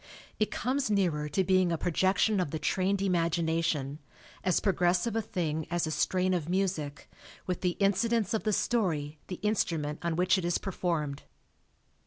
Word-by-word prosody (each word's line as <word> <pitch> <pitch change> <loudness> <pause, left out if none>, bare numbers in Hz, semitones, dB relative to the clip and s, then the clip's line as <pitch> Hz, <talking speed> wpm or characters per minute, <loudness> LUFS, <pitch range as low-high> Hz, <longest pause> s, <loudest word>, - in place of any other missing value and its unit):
It 215 - +2
comes 260 0 -1
nearer 170 -8 +1
to 170 +6 +1
being 185 -1 +3
a 165 - 0
projection 190 +5 +2
of 180 - 0
the 160 - -3
trained 190 +4 0
imagination, 165 -5 0 0.4
as 185 -2 +2
pro 195 - +1
gressive 180 +6 +1
a 225 - +2
thing 160 -7 -2
as 175 0 0
a 155 - -3
strain 185 +4 +1
of 170 -3 -2
music 175 -7 -1 0.4
with 180 -2 -3
the 180 -2 0
incidents 205 +2 +2
of 220 - +1
the 215 - 0
story 160 -10 0
the 185 - -4
instrument 165 -8 0
on 170 -1 -1
which 180 +2 +3
it - - -4
is 175 0 +1
performed. 165 -7 -2
180 Hz, 170 wpm, -30 LUFS, 160-195 Hz, 0.4 s, being